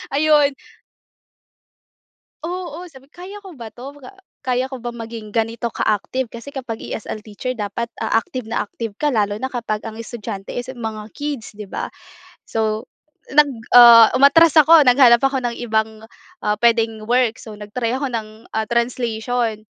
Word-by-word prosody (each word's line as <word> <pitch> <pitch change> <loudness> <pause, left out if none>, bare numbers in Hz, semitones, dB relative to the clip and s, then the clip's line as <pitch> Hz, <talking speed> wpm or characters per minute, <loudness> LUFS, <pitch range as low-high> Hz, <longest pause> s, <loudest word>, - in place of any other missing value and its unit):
ayun. 295 -1 +4 1.9
Oo, 350 0 -5
sabi 275 -3 -17
ko, 350 - -19
"Kaya 410 +1 -10
ko 385 - -10
ba 230 - -7
'to? 245 +5 -10 0.5
Kaya 255 0 -1
ko 260 - -6
ba 240 0 -6
maging 225 -2 -8
ganito 230 +1 -1
ka-active?" 230 +3 -2
Kasi 235 +5 -10
kapag 240 -4 -5
ESL 215 - -6
teacher 215 +4 -6
dapat, 235 0 -4
ah, - - -1
active 255 -4 -7
na 225 - -1
active 215 0 -7
ka 295 +6 0
lalo 205 -4 0
na 260 +5 -4
kapag 230 -4 -3
ang 225 0 -8
estudyante 210 -4 -7
is 245 +1 -4
mga 220 -4 -6
kids, 290 -5 -5
'di 210 -1 -10
ba? - - -5 0.5
So 220 0 -2 0.5
nag 295 0 +6 0.2
ah, 235 -2 +9
umatras 280 +4 +6
ako, 315 -1 +7
naghanap 250 -1 +7
ako 270 -1 0
ng 240 -1 -2
ibang, 220 -1 -2 0.4
ah, 210 - +2
puwedeng 225 -2 +2
work, 245 -2 +1
so 215 -2 -10
nag-try 210 +3 -4
ako 270 -2 -3
ng, 220 0 -6
ah, 220 0 -1
translation. 235 -2 -1
235 Hz, 160 wpm, -20 LUFS, 220-265 Hz, 1.9 s, ah